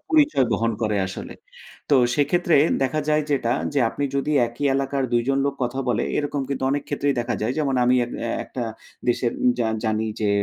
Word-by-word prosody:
পরিচয় 295 - +4
বহন 115 0 +1
করে 105 -1 +1
আসলে। 95 - -7 0.6
তো 140 - +6 0.2
সেক্ষেত্রে 165 +3 +2 0.3
দেখা 135 +4 0
যায় 155 0 +3
যেটা 125 -5 +1 0.2
যে, 140 - +3
আপনি 145 - -3
যদি 140 +2 0
একই 120 +5 -6
এলাকার 135 0 0
২ 120 - +3
জন 135 - +2
লোক 140 0 0
কথা 125 +2 -2
বলে 120 -3 +1 0.2
এরকম 145 -1 -1
কিন্তু 135 -1 -2
অনেক 145 0 0
ক্ষেত্রেই 145 -1 0
দেখা 120 +1 -2
যায়। 110 +3 0
যেমন 140 -3 0
আমি 125 +1 +4
এক 120 - -9 0.3
একটা 125 - -5 0.4
দেশের 120 0 +1
উম 125 - +5
জা 115 -2 +1 0.2
জানি 110 0 0
যে, 105 - +1
135 Hz, 195 wpm, -23 LUFS, 120-145 Hz, 0.6 s, তো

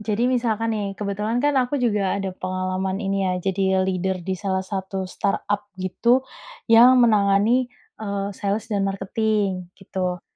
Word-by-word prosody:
Jadi 220 +3 0
misalkan 230 -3 0
nih, 210 -2 -2
kebetulan 210 +4 -2
kan 290 -1 +3
aku 250 +2 0
juga 210 -8 +1
ada 195 -1 -2
pengalaman 185 +2 -3
ini 195 -1 0
ya, 185 - +1
jadi 190 0 +1
leader 185 0 -1
di 185 +1 -3
salah 190 -1 -1
satu 190 0 -4
startup 205 +1 -1
gitu, 235 +7 +1 0.5
yang 245 +2 +8
menangani, 215 +3 +3 0.3
eee, 200 -2 -3
sales 205 +3 -3
dan 200 -2 +1
marketing, 195 -1 -1
gitu. 180 -2 -4
200 Hz, 145 wpm, -23 LUFS, 190-220 Hz, 0.5 s, yang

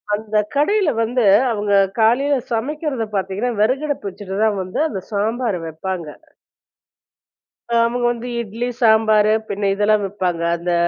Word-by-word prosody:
அந்த 215 0 -7 0.2
கடையில 380 +5 +2
வந்து, 235 +1 +1 0.3
அவுங்க 205 -2 -1 0.3
காலையில 265 +6 +3 0.2
சமைக்கிறத 265 0 -2
பாத்தீங்கன்னா, 195 +5 -1
வெறகடுப்பு 270 -1 0
வச்சுட்டு 195 0 -7
தான் 210 -3 +1
வந்து, 185 +6 -5
அந்த 195 - -5
சாம்பார 220 +2 -1
வெப்பாங்க. 170 +1 -5 1.6
அ - - +2
அவுங்க 240 +1 -1
வந்து 240 +1 -6
இட்லி, 230 +2 -4
சாம்பாரு 220 -2 +4 0.2
பின்ன 200 0 -1
இதெல்லாம் 210 +1 +2
வப்பாங்க. 185 -3 -2 0.2
அந்த 175 +1 -2
220 Hz, 125 wpm, -19 LUFS, 200-245 Hz, 1.6 s, சாம்பாரு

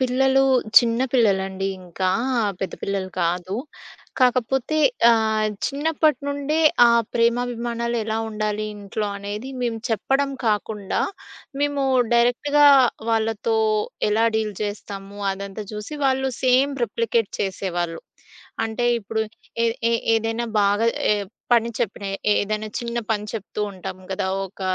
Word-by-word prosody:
పిల్లలు 265 +1 +3 0.4
చిన్న 230 0 0
పిల్లలండి 195 -5 +1
ఇంక. 180 0 -15 0.4
ఆ! - - +2 0.2
పెద్ద 190 - -3
పిల్లలు 195 -1 -2
కాదు. 180 +4 -1 0.6
కాకపోతే 255 +3 +2 0.3
ఆహ్, 220 -1 +2 0.2
చిన్నప్పటి 305 +2 +1
నుండే 285 +2 -1 0.3
ఆ 235 - +7 0.3
ప్రేమాభిమానాలు 235 0 0
ఎలా 220 0 -1
ఉండాలి 215 0 -2
ఇంట్లో 205 +1 -4
అనేది 205 +5 -6
మేము 235 -2 -1
చెప్పడం 270 +5 +1 0.2
కాకుండా, 210 -1 -1 0.6
మేము 285 -1 0 0.3
డైరెక్ట్‌‌గా 245 +5 +4 0.4
వాళ్ళతో 225 0 0 0.5
ఎలా 220 +2 +3
డీల్ 215 -2 -1
చేస్తాము 200 -1 -6
అదంతా 200 +2 -6
చూసి 210 +8 -6
వాళ్ళు 265 0 +2
సేమ్ 260 +2 +4
రిప్లికేట్ 230 0 -1
చేసేవాళ్ళు. 175 -4 -2 0.7
అంటే 225 +2 -2
ఇప్పుడు 220 +1 -2 0.4
ఏ - - +4 0.2
ఏ - - +2 0.2
ఏదైనా 225 +1 -1 0.2
బాగా 205 +2 +2 0.3
ఏ - - +6 0.4
పని 235 -1 +3
చెప్పిన 205 -3 -3 0.3
ఏదన్నా 215 +1 0
చిన్న 235 0 -4
పని 210 -1 -1
చెప్తూ 210 -1 -5
ఉంటాం 185 -1 -7
గదా! 190 0 -2 0.2
ఒక 195 - -15
225 Hz, 120 wpm, -23 LUFS, 205-245 Hz, 0.7 s, ఆ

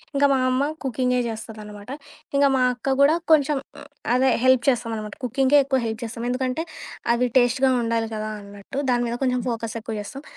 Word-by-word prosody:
ఇంక 280 - +2
మా 265 - +2
అమ్మ 255 +1 +1 0.2
కుకింగే 250 -1 +1
చేస్తదనమాట. 215 -2 -8 0.5
ఇంక 280 - +5
మా 260 - +2
అక్క 265 +2 -1
గూడా 290 +3 +6 0.2
కొంచెం 295 -1 +3 0.2
హ్మ్ - - -11 0.3
అదే 260 +1 +3
హెల్ప్ 260 -2 +5
చేస్తామనమాట. 225 -4 -2
కుకింగే 265 +4 +3
ఎక్కువ 265 -1 +1
హెల్ప్ 220 0 -4
చేస్తాం. 230 0 -6
ఎందుకంటే, 255 +3 -1 0.5
అవి 240 +1 +1
టేస్ట్‌గా 260 +2 +3
ఉండాలి 230 -1 -1
కదా! 215 0 -3
అన్నట్టు. 200 +5 -10
దాని 245 0 +2
మీద 235 - -2
కొంచెం 250 -1 +1
ఫోకస్ 230 -1 -4
ఎక్కువ 220 0 -5
చేస్తాం. 270 +7 -9
245 Hz, 175 wpm, -23 LUFS, 225-265 Hz, 0.5 s, గూడా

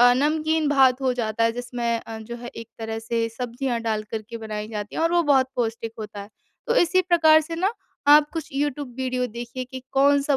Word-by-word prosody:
अ, 245 0 +8
नमकीन 310 +2 +1
भात 265 -2 +4
हो 260 -1 +2
जाता 230 -1 0
है 230 - +2
जिसमें 240 -1 -2
अ, 225 -1 -8
जो 235 +2 -7
है 240 0 -8
एक 230 - -8
तरह 225 0 -4
से 230 0 -1
सब्जियाँ 245 0 -2
डालकर 215 -1 -2
के 230 - -5
बनाई 215 -1 -5
जाती 210 -2 -6
है - - 0
और 330 +1 +2
वो 345 -1 +4
बहुत 260 -1 +3
पौष्टिक 230 -1 -2
होता 210 -1 -7
है। 200 - -9 0.4
तो 475 - +1
इसी 370 0 +4
प्रकार 330 -3 +5
से 325 +2 -6
ना, 385 +6 +1 0.4
आप 295 0 +7
कुछ 325 -3 -4
यूट्यूब 285 -2 -2
वीडियो 255 -1 -1
देखिए 240 +2 -6
कि 260 +1 -8
कौन 280 +1 +4
सा 280 -1 +2
250 Hz, 220 wpm, -24 LUFS, 230-290 Hz, 0.4 s, अ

